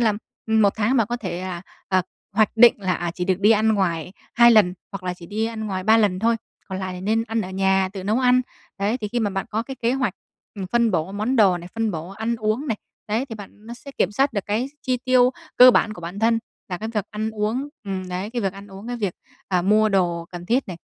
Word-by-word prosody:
là, 225 -3 +3 0.3
ừm, 220 -1 +3
một 200 - +4
tháng 225 +5 +2
bạn 225 -4 +3
có 240 - -2
thể 185 -5 -5
là, 180 -2 -5 0.3
à, 185 -1 +3 0.3
hoạch 215 +1 +4
định 235 +1 +8
là, 185 -1 +1
à, 175 -1 -2
chỉ 180 +1 -4
được 190 0 0
đi 210 +2 +5
ăn 220 0 +4
ngoài 180 -4 0 0.2
2 235 0 +7
lần, 205 -6 +5 0.2
hoặc 195 - -6
là 180 -1 -2
chỉ 175 -1 -12
đi 215 +4 -2
ăn 220 -1 -4
ngoài 185 -2 -3
3 220 +2 +6
lần 205 -5 +2
thôi, 230 +2 +2 0.3
còn 190 0 -4
lại 185 -1 -4
thì 180 - -7
nên 220 +4 +1
ăn 225 -1 -1
ở 185 -3 -5
nhà, 190 0 +2
tự 190 -2 -6
nấu 215 +5 +1
ăn. 250 0 +4 0.4
Đấy, 210 +5 0
thì 210 - -4
khi 240 +3 -1
mà 205 -3 0
bạn 195 +2 -3
có 220 +2 -1
cái 265 +2 -8
kế 235 +2 +2
hoạch, 255 -8 0 0.4
ừm, 195 -2 -5
phân 235 +2 +2
bổ 175 0 -1
món 220 +6 -1
đồ 190 -5 +5
này, 175 +1 -10
phân 225 -1 0
bổ 165 -2 -5
ăn 220 +4 -3
uống 220 +6 -1
này, 225 - -1 0.3
đấy, 225 +6 0
thì 225 - -6
bạn 210 +1 -12
nó 235 - -7
sẽ 280 +3 -11
kiểm 190 - +2
soát 275 +5 +2
được 200 -3 -3
cái 220 +5 0 0.2
chi 255 -1 0
tiêu 255 -1 +5 0.3
cơ 250 +1 +10
bản 215 - +2
của 195 - -10
bản 175 +4 -6
thân 230 +1 +3 0.3
là 180 -1 -4
cái 220 - -4
việc 210 -3 -2
ăn 215 +1 -3
uống 220 +6 -2 0.2
ừm, 190 -2 -4
đấy, 185 +4 -4
cái 240 -2 -3
việc 195 - 0
ăn 200 +1 -11
uống, 195 +3 -10
cái 245 - -3
việc, 200 -6 -2 0.3
à, 180 -2 +1
mua 215 +3 +4
đồ 175 -4 +1
cần 175 0 -7
thiết 245 +1 +1
này. 180 - -5
210 Hz, 270 wpm, -23 LUFS, 185-230 Hz, 0.4 s, cơ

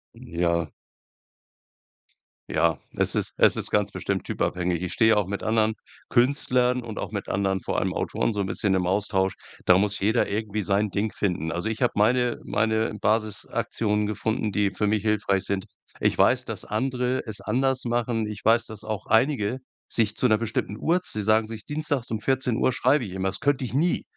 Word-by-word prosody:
Ja. 85 0 -1 1.8
Ja, 80 -2 +2 0.2
es - - +3
ist - - 0
es - - +5
ist - - -2
ganz - - +1
bestimmt - - -3
typabhängig. 90 -1 -1
Ich 90 - -2
stehe 110 -1 +4
auch 105 - +2
mit 100 +2 -4
anderen 110 0 +1 0.4
Künstlern 125 -1 +2
und 115 -2 -6
auch - - -5
mit - - -4
anderen, 95 0 0
vor - - -1
allem - - -1
Autoren, 115 - -1
so 105 - -3
'n - - -1
bisschen 95 +1 +1
im 90 -1 0
Austausch. 95 0 0 0.3
Da 90 0 +6
muss 105 +1 +1
jeder 110 +4 +1
irgendwie 105 +1 -2
sein 100 +1 +1
Ding 105 +3 -1
finden. 85 -5 -2
Also 85 +6 -2
ich 110 +2 -4
habe 125 - +2
meine 120 +3 +2
meine 110 +1 0
Basisaktionen 105 0 0
gefunden, 110 +1 -2
die 100 0 +1
für 95 +2 -2
mich 105 0 +1
hilfreich 100 -2 +1
sind. 100 -1 -2 0.3
Ich - - +2
weiß, - - +3
dass - - -3
andere 125 +2 -1
es 110 -3 -2
anders 130 +3 0
machen. 120 -2 -1
Ich 105 0 -8
weiß, 115 +1 +4
dass 110 -1 -6
auch 110 -2 -5
einige 120 -1 +2 0.3
sich 110 -2 +1
zu 125 - +2
'ner 110 -2 +4
bestimmten 110 -2 -3
Uhrz 180 +7 +1
sie 105 - -2
sagen 110 +1 +3
sich: 110 -2 -7
„Dienstags 145 -5 -2
um 110 -2 -2
14 130 -1 +1
Uhr - - +2
schreibe 145 -4 +2
ich 95 - -8
immer.“ 95 0 -1
Das 95 - -5
könnte 140 -2 +1
ich 125 - -4
nie. 165 +6 +1
110 Hz, 190 wpm, -25 LUFS, 100-120 Hz, 1.8 s, Da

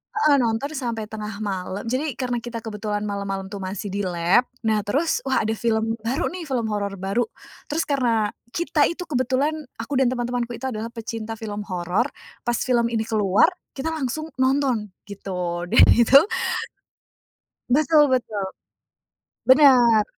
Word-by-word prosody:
heeh 305 -9 +4
nonton 235 +4 0
sampai 235 -7 -3
tengah 215 -1 -5
malam 190 -1 -3
jadi 270 +1 -1
karena 245 -2 -2
kita 230 -1 -7
kebetulan 210 -1 -3
malam-malam 200 -1 -4
tuh 200 - -5
masih 195 +1 -5
di 200 - -3
lab. 175 +7 +3 0.2
Nah 220 -1 +2
terus 295 +10 +1
wah 265 - +2
ada 220 - 0
film 225 0 +1
baru 265 +9 0
nih, 360 -1 -6
film 250 -5 -1
horor 200 -1 -2
baru, 200 +5 -1 0.4
terus 310 +3 0
karena 235 -7 +1 0.2
kita 325 -4 +2
itu 350 +2 -4
kebetulan 260 0 0 0.2
aku 230 +5 -6
dan 265 - +4
teman-temanku 245 -1 -2
itu 265 - -12
adalah 220 0 -4
pecinta 225 0 -5
film 210 -2 -6
horor, 180 +6 0 0.4
pas 240 - +2
film 240 -2 +2
ini 230 -1 -1
keluar, 215 - +3 0.2
kita 300 +4 -2
langsung 310 +1 -3
nonton 260 -4 +2 0.2
gitu 180 -3 -4
dan - - +6
itu 235 +3 +5 1.6
Betul 305 +1 +5
betul, 220 -5 -1 1.1
benar. 255 -6 +7
230 Hz, 150 wpm, -23 LUFS, 210-265 Hz, 1.6 s, benar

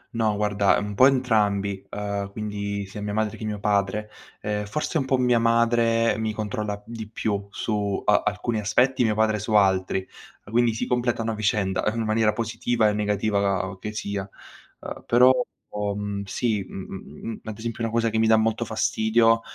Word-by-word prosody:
No 110 -2 +1
guarda 105 -1 +2
un 105 0 -3
po' 130 +6 +7
entrambi, 105 -7 +1
uhm, 100 -1 -3
quindi 100 -1 -4
sia 105 +2 -8
mia 105 0 -3
madre 110 -1 0
che 110 - -7
mio 105 -1 -3
padre. 105 +1 0 0.3
Ehm, 105 0 -2
forse 150 +8 -1
un 135 - -1
po' 130 -1 +2
mia 125 -2 +3
madre 115 -1 +3
mi 110 -1 -1
controlla 105 -1 -3
di 115 -2 -7
più 100 -2 -2
su 100 -1 -2
a 105 - +4
alcuni 105 +2 -1
aspetti, 125 +5 +2
mio 110 -2 +2
padre 110 -1 +2
su 105 +2 -3
altri, 95 -1 +2 0.4
quindi 115 -1 +3
si - - -2
completano 120 -2 0
a - - -2
vicenda 105 -1 0
in 115 +1 -2
maniera 110 0 +2
positiva 115 +1 0
e - - 0
negativa 100 -2 0
che 105 - -5
sia. 100 -2 -4 0.5
Uhm, - - -7
però 125 +2 +6 0.4
ho 105 -1 -1
mhmm, 100 -1 -3
sì, 105 0 -1
mhmm, 95 +4 -7
ad 110 -2 -6
esempio 115 +1 -5
una 115 - -1
cosa 115 0 +1
che 110 - 0
mi 110 - +3
dà 110 0 +6
molto 110 +1 +1
fastidio 115 +1 +2
105 Hz, 180 wpm, -25 LUFS, 100-115 Hz, 0.5 s, po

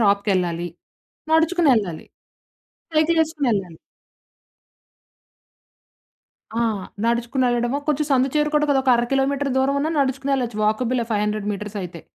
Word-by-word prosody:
షాప్‌కెళ్ళాలి. 190 -5 +1 0.6
నడుచుకొని 325 -1 +3
ఎళ్ళాలి. 180 -7 -3 0.9
సైకిల్ 320 +2 +3
ఏసుకొని 300 -4 -2
ఎళ్ళాలి. 185 -5 -4 2.8
ఆ! - - +3 0.4
నడుచుకొనెళ్ళడమో, 240 +2 0
కొంచెం 300 0 +1
సందు 265 0 +3
చేరుకోడానికి 300 -1 +2
అదొక 265 -1 +2
అర 235 - +2
కిలోమీటర్ 275 +1 +1
దూరమున్నా 280 +3 +1
నడుచుకొని 270 0 0
ఎళ్ళొచ్చు. 240 -4 -2
వాకబుల్ 240 +4 +1
500 210 0 -1
మీటర్స్ 210 +1 -6
అయితే 175 -1 -8
255 Hz, 105 wpm, -22 LUFS, 210-280 Hz, 2.8 s, నడుచుకొని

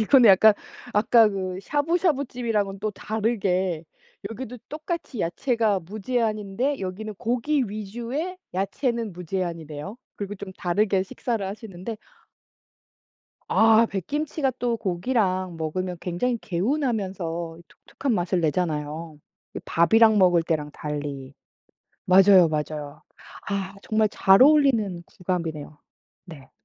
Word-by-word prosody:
이 - - +2
근데 255 -6 +7
약간 205 +3 +7 0.4
아까 220 +1 +5
그 185 -2 -4
샤부샤부 295 - +1
집이랑은 215 -6 -2
또 215 0 -1
다르게 190 -6 -1 0.5
여기도 245 +2 -7
똑같이 305 - -5
야채가 215 +3 0
무제한인데 215 - -2
여기는 200 +3 -5
고기 250 +7 0
위주의 235 - -4 0.2
야채는 225 +3 -1
무제한이네요. 170 0 -5 0.2
그리고 205 0 -5
좀 195 -1 -8
다르게 190 +2 +1
식사를 220 +2 -3
하시는데 200 +1 -7 1.5
아 225 +1 +5
백김치가 280 - -2
또 240 -1 0
고기랑 185 -3 -1
먹으면 180 +3 -3
굉장히 190 +8 -1
개운하면서 190 - -2
독특한 270 -4 -4
맛을 175 -1 0
내잖아요. 155 -1 -2 0.4
이 - - -3
밥이랑 220 +6 +4
먹을 175 -3 +5
때랑 155 -3 -2
달리. 145 -3 -5 0.7
맞아요 185 -1 +7
맞아요. 150 -1 -4 0.5
아 195 -1 -3
정말 215 0 +2
잘 195 +3 +5
어울리는 260 - +4 0.2
궁합이네요. 160 -5 -3 0.5
네. 140 -6 -13
195 Hz, 280 characters per minute, -25 LUFS, 175-230 Hz, 1.5 s, 근데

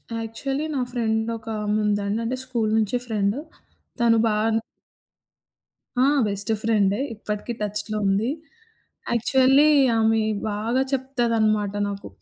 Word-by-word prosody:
Actually 270 +6 -3
నా 260 - 0
friend 220 -2 -1
ఒకామె 215 -1 -2
ఉందండి. 205 +1 0
అంటే 255 +3 -1
స్కూలు 235 -4 -1
నుంచి 220 +3 +1
ఫ్రెండ్. 210 -2 0 0.6
తను 230 -1 +4
బాన్ 220 +1 +1 1.5
ఆ! - - +5 0.2
బెస్ట్ 200 +2 +2
ఫ్రెండే. 210 -2 +1 0.2
ఇప్పటికీ 210 +2 -5
టచ్‌లో 210 +1 0
ఉంది. 205 +5 +1 0.8
యాక్చువల్లి 265 +5 +4 0.3
ఆమె 220 0 +3 0.3
బాగా 225 +5 -1
చెప్తదనమాట 230 -6 0 0.2
నాకు. 200 - -7
220 Hz, 110 wpm, -23 LUFS, 210-235 Hz, 1.5 s, ఆ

